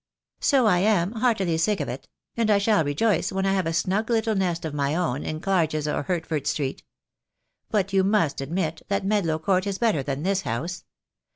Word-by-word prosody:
"So 270 Hz, -4 st, +3 dB
I 180 Hz, -5 st, +4 dB
am, 195 Hz, -2 st, +2 dB
heartily 215 Hz, -8 st, +1 dB
sick 205 Hz, +4 st, +1 dB
of -, -, -2 dB
it; -, -, -6 dB, 0.3 s
and 230 Hz, -2 st, +1 dB
I 210 Hz, -, +5 dB
shall 200 Hz, -2 st, +3 dB
rejoice 160 Hz, +7 st, +1 dB
when 190 Hz, 0 st, -1 dB
I 195 Hz, -, +2 dB
have 190 Hz, -4 st, 0 dB
a -, -, 0 dB
snug 190 Hz, +7 st, 0 dB
little 225 Hz, -1 st, +1 dB
nest 180 Hz, -4 st, -1 dB
of 155 Hz, -, -4 dB
my 145 Hz, +1 st, 0 dB
own 150 Hz, -6 st, -1 dB
in 155 Hz, -, -4 dB
Clarges 160 Hz, -5 st, 0 dB
or 150 Hz, -, -1 dB
Hert 165 Hz, +2 st, -2 dB
ford 150 Hz, -4 st, -3 dB
Street. 135 Hz, -3 st, -2 dB, 0.9 s
But 200 Hz, -2 st, 0 dB
you 190 Hz, -1 st, +4 dB
must 190 Hz, -9 st, +1 dB
admit 160 Hz, +2 st, -2 dB
that 200 Hz, 0 st, -1 dB
Medlow 195 Hz, -6 st, +1 dB
Court 185 Hz, +3 st, +1 dB
is 195 Hz, -1 st, -2 dB
better 220 Hz, -11 st, +1 dB
than 140 Hz, +2 st, -4 dB
this 195 Hz, +1 st, +1 dB
house. 165 Hz, +7 st, -4 dB
185 Hz, 205 wpm, -25 LUFS, 155-205 Hz, 0.9 s, I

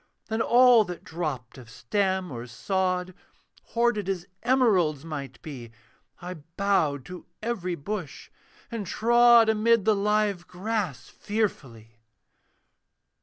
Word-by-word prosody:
Then 220 Hz, +1 st, -1 dB
all 245 Hz, -1 st, +6 dB
that 180 Hz, -2 st, -8 dB
dropped 145 Hz, -7 st, -5 dB
of 120 Hz, -3 st, -14 dB
stem 190 Hz, -, -1 dB
or 120 Hz, -1 st, -7 dB
sod, 185 Hz, -, -1 dB, 0.5 s
Hoarded 230 Hz, -4 st, 0 dB
as 180 Hz, -3 st, -2 dB, 0.2 s
emeralds 195 Hz, -, +2 dB
might 140 Hz, -6 st, -6 dB
be, 130 Hz, -7 st, -8 dB, 0.5 s
I 180 Hz, 0 st, -6 dB, 0.2 s
bowed 160 Hz, -9 st, +1 dB
to 180 Hz, -1 st, -10 dB, 0.2 s
every 190 Hz, -7 st, -2 dB
bush, 175 Hz, +1 st, -6 dB, 0.4 s
and 220 Hz, -5 st, -4 dB
trod 235 Hz, +2 st, +5 dB
Amid 220 Hz, -1 st, +3 dB
the 220 Hz, -, +5 dB
live 205 Hz, -2 st, 0 dB
grass 190 Hz, -, -3 dB
fearfully. 125 Hz, -, -4 dB
190 Hz, 115 wpm, -26 LUFS, 155-220 Hz, 0.5 s, all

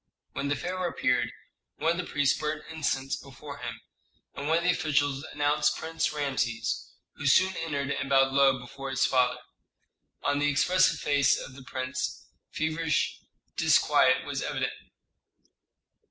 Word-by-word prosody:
When 140 Hz, -, -2 dB
the 145 Hz, -, +1 dB
pharaoh 180 Hz, +1 st, -2 dB
appeared, 125 Hz, -6 st, +1 dB, 0.5 s
one 165 Hz, -, +2 dB
of 170 Hz, -, -2 dB
the 180 Hz, -, -5 dB
priests 145 Hz, -2 st, +2 dB
burnt 150 Hz, 0 st, -3 dB
incense 135 Hz, -4 st, -1 dB
before 140 Hz, +2 st, -10 dB
him, 120 Hz, -2 st, -6 dB, 0.5 s
and 140 Hz, -, -5 dB
one 160 Hz, +1 st, +3 dB
of 170 Hz, -, -1 dB
the 180 Hz, -, +4 dB
officials 145 Hz, -4 st, 0 dB
announced 145 Hz, +1 st, +1 dB
Prince 160 Hz, 0 st, -1 dB
Rameses, 135 Hz, -6 st, -2 dB, 0.3 s
who 145 Hz, -, -2 dB
soon 185 Hz, +7 st, +4 dB
entered 140 Hz, -4 st, -2 dB
and 140 Hz, -1 st, -2 dB
bowed 135 Hz, -1 st, +4 dB
low 135 Hz, -1 st, +5 dB
before 135 Hz, +2 st, -8 dB
his 135 Hz, 0 st, +2 dB
father. 125 Hz, -1 st, +2 dB, 0.9 s
On 145 Hz, 0 st, +1 dB
the 145 Hz, 0 st, +2 dB
expressive 185 Hz, +6 st, +3 dB
face 145 Hz, -2 st, +3 dB
of -, -, -8 dB
the 135 Hz, -, -12 dB
prince 130 Hz, +1 st, -4 dB, 0.2 s
feverish 160 Hz, -1 st, -1 dB, 0.4 s
disquiet -, -, +4 dB
was -, -, -3 dB
evident. -, -, -2 dB
145 Hz, 150 wpm, -28 LUFS, 135-155 Hz, 0.9 s, low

